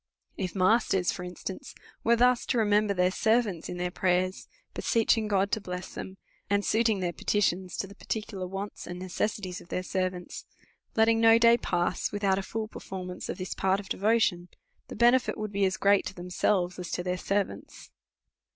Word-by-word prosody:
If 185 -1 -4
masters, 190 -1 +3
for 180 - -6
instance, 185 +8 -7 0.3
were 235 - +4
thus 245 +1 +3
to - - +1
remember 210 -1 +3
their 180 0 +3
servants 220 -5 +1
in 175 - -5
their 180 0 -2
prayers, 185 0 0 0.3
beseeching 225 -1 +2
God 200 -1 +1
to 220 - 0
bless 180 -1 -6
them, 190 0 -7 0.3
and 200 0 +1
suiting 220 -3 +2
their 175 -1 -1
petitions 185 -3 0
to 195 - -2
tiie 200 - -15
particular 205 -4 -4
wants 195 +2 -6
and 175 - -6
necessities 185 +1 -3
of - - -15
their 180 - -2
servants; 185 -1 -3 0.5
letting 225 0 +4
no 225 0 +7
day 230 0 +6
pass 175 -6 -1
without 200 -2 +1
a - - -2
full 215 +2 -4
performance 185 -3 -7
of - - -3
this 185 -1 -4
part 190 +1 +1
of 200 - -10
devo 220 +4 +2
tion, 175 -5 0 0.4
the - - -8
benefit 240 +3 +3
would 215 -1 -4
be 200 -1 +1
as 190 - 0
o>reat 200 0 +4
to - - -8
themselves 180 +1 0
as 180 - -5
to 175 - -2
their 180 0 -1
servants. 190 - -3
195 Hz, 185 wpm, -28 LUFS, 180-215 Hz, 0.5 s, no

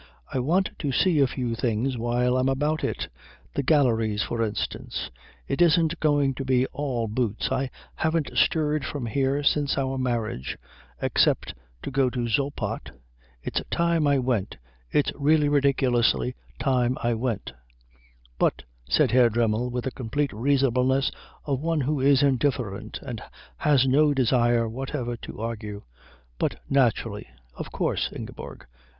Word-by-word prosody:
"I - - 0
want 175 +9 +1
to 145 - -1
see 165 +3 +3
a 135 - +5
few 125 -2 -3
things 120 +3 0
while 120 +1 +1
I'm 130 +1 +2
about 150 +4 0
it - - -2 0.5
the - - 0
galleries, 115 -7 +2
for 115 - -3
instance. 105 -2 -3 0.4
It 135 - -1
isn't 165 -1 +4
going 145 -3 +2
to 135 - -5
be 130 -1 +2
all 130 -6 -2
boots. 110 0 -1
I 130 0 0 0.3
haven't 160 -2 0
stirred 150 -2 +2
from 130 -1 -4
here 135 +5 0
since 145 0 +2
our 135 -1 -1
marriage, 115 - -2 0.5
except - - +2 0.3
to - - -4
go 135 -1 +2
to 120 -1 -2
Zoppot 140 +5 -2 0.5
it's - - -1
time 170 -3 +2
I 140 -1 +4
went 125 -6 -1 0.3
it's 145 - +2
really 150 +1 +3
ridiculously 125 - +2 0.2
time 125 - +1
I 120 0 +2
went 110 - -2 0.4
" - - -32
"But," 65 - +1 0.3
said 110 - +3
Herr 120 -1 +5
Dremmel, 115 +1 +1
with 125 0 -3
the 130 - -2
complete 135 +3 -2
reasonableness 130 +2 +2 0.3
of 140 -3 -1
one 165 -1 0
who 145 +2 0
is 140 +1 +4
indifferent 130 -6 0
and - - -6 0.4
has 140 -4 +3
no 145 +2 +4
desire 120 -2 +3
whatever 125 +1 -4
to - - -9
argue, 105 -3 -5 0.6
"but - - -1
naturally. 115 -5 +1 0.3
Of - - -7
course, - - -1
Ingeborg." - - -8
130 Hz, 145 wpm, -25 LUFS, 115-140 Hz, 0.6 s, a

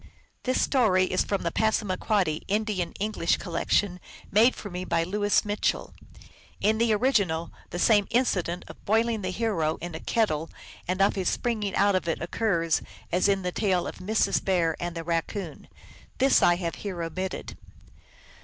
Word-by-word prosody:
This 255 0 +1
story 215 -9 +3
is 185 - +1
from 200 -2 -2
the 170 - -1
Passamaquoddy 200 -5 0
Indian 205 -4 -1
Eng 210 +2 -1
lish 170 -5 +1
collection 180 +1 0 0.3
made 225 +5 +5
for 205 - -8
me 180 +1 -4
by 165 -2 +1
Louis 205 +4 +1
Mitchell. 210 0 -1 0.7
In 215 +2 +2
the 230 -1 +3
original, 200 -8 +1 0.2
the - - -5
same 205 +1 +4
incident 180 -8 0
of - - -13
boiling 225 +1 +1
the 185 - -2
hero 185 -7 0
in 175 0 -6
a 160 - -5
kettle 165 -9 0 0.4
and 185 +2 +2
of 200 - +3
his 190 -3 0
springing 215 -5 -1
out 200 0 +4
of 185 -2 0
it 165 - -1
occurs 170 -3 0 0.3
as 180 +3 +3
in 195 -1 +1
the 180 - -1
tale 185 -3 +1
of - - -7
Mrs. 215 +4 +1
Bear 170 -4 +1
and 175 0 -4
the 165 - -4
Raccoon. 170 +1 -3 0.5
This 270 +1 +4
I 175 - +5
have 170 -2 -3
here 185 -5 -4
omitted. 185 +3 -4
190 Hz, 170 wpm, -27 LUFS, 175-215 Hz, 0.7 s, made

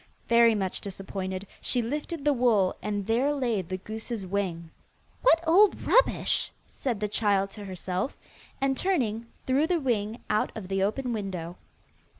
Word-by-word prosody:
Very 235 -1 +6
much 190 -3 -1
disappointed, 190 -1 -5 0.2
she 245 -2 +1
lifted 295 +4 -4
the 295 - +5
wool, 230 -7 +3
and 205 0 -2
there 245 +7 +2
lay 240 -7 0
the 185 +1 -5
goose's 220 +1 -5
wing. 180 -4 -3 0.5
'What 335 -9 +5
old 390 +5 +5
rubbish,' - - +3
said 240 -6 -3
the 210 - 0
child 200 -2 +1
to 205 -1 -9
herself, 185 - -3 0.4
and, 270 0 +1
turning, 240 - 0 0.2
threw 275 +4 +2
the 350 -1 +1
wing 230 -4 -1
out 210 - +1
of 190 -4 -7
the 195 0 0
open 240 +5 0
window. 185 -5 -4
215 Hz, 155 wpm, -27 LUFS, 195-260 Hz, 0.5 s, Very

